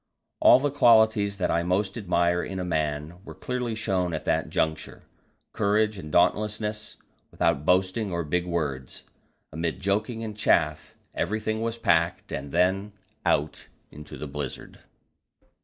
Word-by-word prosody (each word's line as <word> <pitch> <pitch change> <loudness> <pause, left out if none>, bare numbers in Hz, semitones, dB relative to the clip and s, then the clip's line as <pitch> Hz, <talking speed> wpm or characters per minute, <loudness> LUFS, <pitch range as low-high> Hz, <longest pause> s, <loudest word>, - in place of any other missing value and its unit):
All - - +8
the 145 +1 0
qualities 110 -6 +4
that 90 -3 0
I 85 - +2
most 95 +3 0
admire 90 -4 +1
in 95 - -5
a 90 - -3
man 80 +1 -3
were - - -10
clearly 125 -3 -3
shown 95 -5 -1
at 80 - -6
that - - 0
juncture: 80 0 -2 0.5
courage 105 0 +1
and 75 -4 -8
dauntlessness, 105 +4 0 0.3
without 70 +2 0
boasting 95 +3 +2
or 85 -1 -1
big 90 +4 -1
words. 70 -7 -3 0.5
Amid 80 0 -3
joking 110 +4 -1
and 110 -2 -5
chaff, 75 -7 +1 0.2
everything 110 +3 -2
was 115 0 -2
packed, 85 -6 +1
and 70 0 -5
then 95 +4 +1 0.3
out 75 +1 0 0.2
into 75 +1 -10
the - - -6
blizzard. 70 -2 -7
90 Hz, 140 wpm, -26 LUFS, 80-110 Hz, 0.5 s, All